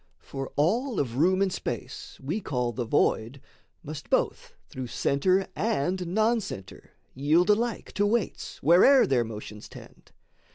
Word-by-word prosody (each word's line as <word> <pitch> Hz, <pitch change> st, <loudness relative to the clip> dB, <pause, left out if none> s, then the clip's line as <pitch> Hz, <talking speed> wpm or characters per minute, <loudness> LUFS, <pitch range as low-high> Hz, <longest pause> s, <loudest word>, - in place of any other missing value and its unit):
For 135 Hz, -1 st, -7 dB
all 220 Hz, -, +1 dB
of 125 Hz, -3 st, -2 dB
room 185 Hz, +6 st, +3 dB
and 190 Hz, -2 st, -1 dB
space -, -, -6 dB
we 160 Hz, +11 st, -3 dB
call 125 Hz, -7 st, -1 dB
the 120 Hz, +1 st, -4 dB
void 115 Hz, +3 st, +1 dB, 0.4 s
Must 150 Hz, -1 st, -8 dB
both -, -, -1 dB
through 130 Hz, -1 st, -6 dB
centre 185 Hz, +11 st, +1 dB
and 185 Hz, -3 st, -1 dB
non 220 Hz, +6 st, +2 dB
centre 95 Hz, -, -9 dB, 0.2 s
yield 160 Hz, +8 st, +3 dB
Alike 230 Hz, +2 st, -1 dB
to 205 Hz, 0 st, +1 dB
weights 225 Hz, -1 st, -2 dB
where'er 185 Hz, -, +6 dB
their 130 Hz, -3 st, +2 dB
motions 105 Hz, -1 st, -9 dB
tend. -, -, -14 dB
165 Hz, 140 wpm, -27 LUFS, 130-205 Hz, 0.4 s, where'er